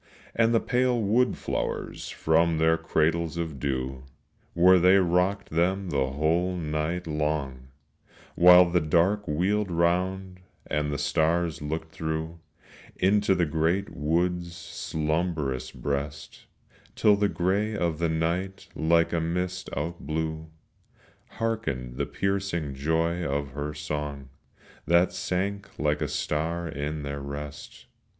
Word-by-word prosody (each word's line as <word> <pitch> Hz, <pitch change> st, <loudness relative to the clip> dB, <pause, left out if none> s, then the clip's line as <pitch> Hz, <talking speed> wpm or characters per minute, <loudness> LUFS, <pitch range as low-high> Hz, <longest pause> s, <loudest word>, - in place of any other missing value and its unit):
And 115 Hz, 0 st, +3 dB
the 115 Hz, -, +4 dB
pale 125 Hz, 0 st, +1 dB
wood 115 Hz, +4 st, +2 dB
flowers -, -, -3 dB
from 80 Hz, +1 st, +2 dB
their 80 Hz, +1 st, +4 dB
cradles 80 Hz, 0 st, 0 dB
of 80 Hz, -5 st, -4 dB
dew 65 Hz, -1 st, -2 dB, 0.5 s
Where 90 Hz, +2 st, +6 dB
they 90 Hz, +3 st, +6 dB
rocked 90 Hz, +2 st, +1 dB
them 90 Hz, +3 st, 0 dB
the 65 Hz, -2 st, +1 dB
whole 85 Hz, +5 st, +1 dB
night 80 Hz, +1 st, -2 dB
long, 75 Hz, -4 st, -2 dB, 0.7 s
While 90 Hz, 0 st, +8 dB
the 90 Hz, -1 st, +3 dB
dark 90 Hz, +7 st, +2 dB
wheeled 95 Hz, +7 st, 0 dB
round 90 Hz, +2 st, 0 dB, 0.3 s
and 75 Hz, -1 st, -1 dB
the 70 Hz, -, -2 dB
stars 80 Hz, +2 st, +1 dB
looked 80 Hz, +2 st, -4 dB
through 80 Hz, +1 st, -4 dB, 0.6 s
Into 100 Hz, +1 st, +3 dB
the 90 Hz, -2 st, +2 dB
great 80 Hz, +6 st, 0 dB
wood's 85 Hz, +3 st, 0 dB
slumbrous 80 Hz, -5 st, -2 dB
breast, 70 Hz, +2 st, -5 dB, 0.5 s
Till 105 Hz, -1 st, +5 dB
the 100 Hz, 0 st, +1 dB
gray 100 Hz, +4 st, 0 dB
of 85 Hz, -4 st, -1 dB
the 85 Hz, -1 st, +1 dB
night 85 Hz, +4 st, -2 dB
like 85 Hz, +1 st, +2 dB
a 85 Hz, -, +1 dB
mist 90 Hz, +2 st, -2 dB
outblew; 80 Hz, 0 st, -3 dB, 0.9 s
Hearkened 70 Hz, -, -2 dB
the 70 Hz, -, -1 dB
piercing 95 Hz, -6 st, -2 dB
joy 80 Hz, +5 st, 0 dB
of 70 Hz, -1 st, -2 dB
her 75 Hz, +2 st, -4 dB
song 75 Hz, -2 st, -4 dB, 0.6 s
That 85 Hz, +2 st, +4 dB
sank 100 Hz, +2 st, -3 dB
like 75 Hz, 0 st, 0 dB
a -, -, 0 dB
star 85 Hz, +3 st, -2 dB
in 75 Hz, 0 st, -4 dB
their 70 Hz, 0 st, -4 dB
rest. 70 Hz, +1 st, -8 dB
85 Hz, 125 wpm, -27 LUFS, 75-90 Hz, 0.9 s, While